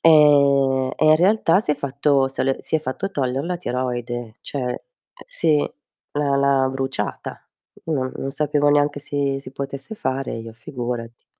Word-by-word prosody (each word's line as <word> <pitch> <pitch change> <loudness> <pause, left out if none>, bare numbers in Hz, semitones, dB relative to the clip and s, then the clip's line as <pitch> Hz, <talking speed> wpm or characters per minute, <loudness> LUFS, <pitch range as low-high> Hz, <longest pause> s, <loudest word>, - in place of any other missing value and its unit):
ehm, 140 -4 +5
e - - +1
in 155 - +8
realtà 185 0 +4
si 210 - -2
è - - -4
fatto 140 0 +1
se 135 - -2
l 135 0 +1
si - - -4
è - - -3
fatto 155 +8 -3
togliere 135 -1 -1
la 180 0 -1
tiroide, 120 -5 -3
cioè 145 - -5
eh - - -6 0.4
sì, 330 - +2 0.5
l'ha 145 -1 +1
l'ha 140 -1 +3
bruciata. 135 0 -4 0.4
Non 130 -5 -1
non 135 - -3
sapevo 145 0 +1
neanche 145 0 +2
si 140 -1 -1
si 135 -1 -10
potesse 140 +6 -5
fare 135 -8 -2
io 115 0 -8
figurati. 120 -1 -6
140 Hz, 165 wpm, -22 LUFS, 130-150 Hz, 0.5 s, in